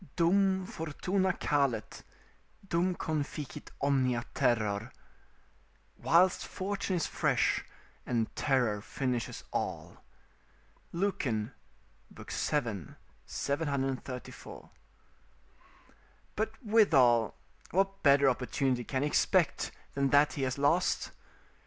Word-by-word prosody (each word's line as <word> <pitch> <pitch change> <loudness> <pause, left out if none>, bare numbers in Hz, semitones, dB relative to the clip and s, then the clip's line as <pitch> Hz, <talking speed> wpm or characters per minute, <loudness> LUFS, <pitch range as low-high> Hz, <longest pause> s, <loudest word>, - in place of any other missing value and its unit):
"Dum 190 +2 +3
fortuna 185 +4 -1
calet, 140 -10 -1 0.7
dum 180 +1 +1
conficit 150 -3 -4
omnia 130 -4 +1
terror." 110 0 0 1.0
["Whilst 180 +3 +3
fortune 195 0 -2
is 170 - 0
fresh, - - +1 0.4
and 115 -3 -1
terror 125 -7 +1
finishes 125 +1 -3
all." - - -3 0.9
Lucan, 140 - -1 0.6
vii. - - -12 1.0
734.] 135 -4 -4 1.6
But 220 +3 -3
withal, 135 - +4 0.3
what 195 +2 0
better 140 -1 +5
opportunity 130 0 0
can 130 +3 -2
he - - +2
expect - - +2 0.2
than 140 -1 +1
that 145 +2 +4
he 140 - -4
has 130 0 -1
lost? 145 +6 +1
140 Hz, 85 wpm, -31 LUFS, 125-180 Hz, 1.6 s, better